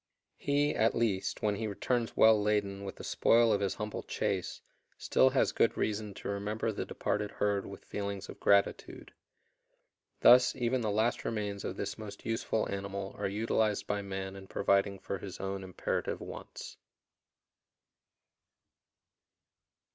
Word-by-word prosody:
He, 145 Hz, +1 st, +1 dB
at 110 Hz, +1 st, +2 dB
least, 110 Hz, -5 st, -1 dB
when 105 Hz, -1 st, +1 dB
he 110 Hz, -, -2 dB
returns 115 Hz, +3 st, -1 dB
well 110 Hz, -1 st, +6 dB
laden 100 Hz, -1 st, 0 dB
with 95 Hz, -, -6 dB
the -, -, -10 dB
spoil 115 Hz, -1 st, +4 dB
of 100 Hz, -, +1 dB
his 100 Hz, -2 st, 0 dB
humble 105 Hz, 0 st, -4 dB
chase, -, -, -2 dB, 0.4 s
still 130 Hz, -, +4 dB
has 130 Hz, 0 st, +2 dB
good -, -, +2 dB
reason 105 Hz, -1 st, -2 dB
to -, -, -7 dB
remember 105 Hz, +3 st, -2 dB
the 105 Hz, -, -4 dB
departed 105 Hz, 0 st, -2 dB
herd 100 Hz, -1 st, -1 dB
with 100 Hz, -, -10 dB
feelings 100 Hz, -1 st, -4 dB
of -, -, -10 dB
gratitude. 100 Hz, 0 st, +1 dB, 1.1 s
Thus 125 Hz, +1 st, +7 dB
even 125 Hz, 0 st, 0 dB
the 110 Hz, -, 0 dB
last 110 Hz, +3 st, +1 dB
remains 105 Hz, -3 st, -3 dB
of -, -, -4 dB
this 100 Hz, -, -4 dB
most 100 Hz, -2 st, -9 dB
useful 115 Hz, -1 st, -1 dB
animal 100 Hz, 0 st, -4 dB
are -, -, 0 dB
utilized 105 Hz, +1 st, 0 dB
by 105 Hz, 0 st, -1 dB
man 95 Hz, -1 st, -5 dB
in 95 Hz, -1 st, -10 dB
providing 100 Hz, 0 st, +1 dB
for 100 Hz, 0 st, -5 dB
his 95 Hz, -3 st, -8 dB
own 95 Hz, 0 st, -3 dB
imperative 95 Hz, -1 st, -2 dB
wants. -, -, -9 dB
105 Hz, 145 wpm, -31 LUFS, 100-110 Hz, 1.1 s, Thus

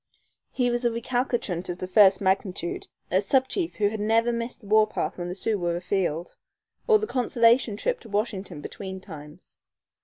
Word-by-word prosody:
He 245 Hz, -2 st, +1 dB
was 240 Hz, +1 st, -1 dB
a 240 Hz, -, +3 dB
recalcitrant 235 Hz, -6 st, -2 dB
of 175 Hz, -, -3 dB
the 185 Hz, -, -4 dB
first 190 Hz, 0 st, +5 dB
magnitude, 190 Hz, -2 st, -1 dB, 0.2 s
a 185 Hz, +2 st, +3 dB
sub 260 Hz, +6 st, +2 dB
chief 345 Hz, +1 st, -2 dB
who 205 Hz, -1 st, +2 dB
had 215 Hz, 0 st, -5 dB
never 225 Hz, +3 st, +2 dB
missed 235 Hz, +1 st, -4 dB
the -, -, -16 dB
warpath 215 Hz, -2 st, +2 dB
when 175 Hz, -, -3 dB
the 180 Hz, -, -5 dB
Sioux 210 Hz, +1 st, -1 dB
were 175 Hz, -1 st, -1 dB
afield, 175 Hz, -2 st, -2 dB, 0.5 s
or 440 Hz, -3 st, +6 dB
the 430 Hz, -, -2 dB
consolation 235 Hz, -, +2 dB
trip -, -, -1 dB
to -, -, -14 dB
Washington 200 Hz, -6 st, -3 dB
between 190 Hz, +4 st, -7 dB
times. 150 Hz, -6 st, -12 dB
210 Hz, 180 wpm, -26 LUFS, 185-240 Hz, 0.5 s, or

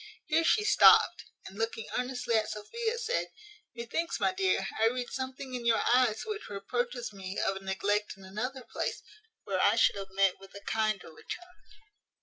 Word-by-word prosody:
Here 330 Hz, -1 st, +2 dB
she 420 Hz, +5 st, +3 dB
stopt, 420 Hz, -, +6 dB, 0.2 s
and, 195 Hz, +3 st, -10 dB
looking 225 Hz, -1 st, -2 dB
earnestly 250 Hz, -1 st, -2 dB
at 220 Hz, -1 st, +2 dB
Sophia, 455 Hz, -, -3 dB
said, 475 Hz, +1 st, -1 dB, 0.5 s
"Methinks, 235 Hz, +8 st, -2 dB
my -, -, +2 dB
dear, 380 Hz, 0 st, +1 dB
I 225 Hz, -, +5 dB
read 245 Hz, +1 st, -2 dB
something 260 Hz, 0 st, -5 dB
in 245 Hz, -1 st, -4 dB
your 230 Hz, -1 st, +3 dB
eyes 245 Hz, -4 st, +3 dB
which 425 Hz, -1 st, -5 dB
reproaches 240 Hz, +4 st, -3 dB
me 190 Hz, -1 st, -7 dB
of 195 Hz, -, +1 dB
a 195 Hz, -, -10 dB
neglect 205 Hz, +2 st, -1 dB
in 195 Hz, -, -13 dB
another 250 Hz, +7 st, -4 dB
place, -, -, -4 dB, 0.4 s
where -, -, -1 dB
I -, -, +5 dB
should -, -, +4 dB
have 195 Hz, -1 st, -6 dB
met 195 Hz, -1 st, +2 dB
with 195 Hz, 0 st, -15 dB
a 200 Hz, -, -8 dB
kinder 215 Hz, -5 st, -1 dB
return." 355 Hz, -, -9 dB
235 Hz, 175 wpm, -30 LUFS, 200-270 Hz, 0.5 s, stopt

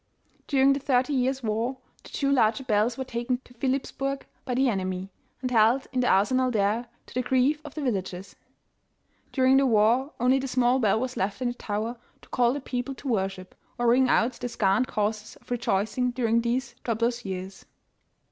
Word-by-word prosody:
During 275 Hz, -1 st, +4 dB
the 275 Hz, -, -2 dB
thirty 265 Hz, +1 st, +1 dB
years' 260 Hz, 0 st, 0 dB
war, 225 Hz, +4 st, -1 dB, 0.3 s
the -, -, -13 dB
two 275 Hz, -1 st, -1 dB
larger 235 Hz, -1 st, +3 dB
bells 225 Hz, 0 st, +1 dB
were 265 Hz, -, -2 dB
taken 245 Hz, 0 st, -2 dB
to 250 Hz, -, -18 dB
Philipps 260 Hz, +2 st, -1 dB
burg 275 Hz, 0 st, -3 dB, 0.2 s
by 250 Hz, -2 st, -2 dB
the 265 Hz, +1 st, +3 dB
enemy, 190 Hz, -3 st, -2 dB, 0.3 s
and 255 Hz, -, -1 dB
held 235 Hz, +3 st, +4 dB
in 255 Hz, -, 0 dB
the 250 Hz, -, +2 dB
arsenal 255 Hz, +7 st, +3 dB
there, 220 Hz, +1 st, 0 dB, 0.2 s
to -, -, -15 dB
the 255 Hz, -, 0 dB
grief 260 Hz, +4 st, +2 dB
of 295 Hz, -3 st, -10 dB
the 305 Hz, -, -4 dB
villagers. 190 Hz, -6 st, -3 dB, 1.0 s
During 260 Hz, 0 st, +4 dB
the 275 Hz, 0 st, +4 dB
war 235 Hz, +5 st, +3 dB
only 255 Hz, +2 st, +3 dB
the 270 Hz, -, -3 dB
small 255 Hz, 0 st, +2 dB
bell 220 Hz, -2 st, +2 dB
was 255 Hz, +1 st, -3 dB
left 200 Hz, +3 st, -1 dB
in 250 Hz, -1 st, 0 dB
the -, -, -3 dB
tower 225 Hz, +1 st, -4 dB, 0.3 s
to -, -, -18 dB
call 240 Hz, -1 st, +2 dB
the 285 Hz, -, -4 dB
people 255 Hz, +1 st, -4 dB
to 280 Hz, -, -9 dB
worship, 190 Hz, -5 st, -2 dB, 0.2 s
or 240 Hz, -, -1 dB
ring 255 Hz, +1 st, +4 dB
out 235 Hz, +1 st, +3 dB
the 245 Hz, -, -3 dB
scant 215 Hz, +1 st, +1 dB
causes 215 Hz, +1 st, -2 dB
of -, -, -19 dB
rejoicing 240 Hz, +1 st, 0 dB
during 235 Hz, -2 st, +1 dB
these 240 Hz, +1 st, -1 dB
troublous 235 Hz, +1 st, -1 dB
years. 190 Hz, 0 st, -6 dB
245 Hz, 195 wpm, -26 LUFS, 215-260 Hz, 1.0 s, During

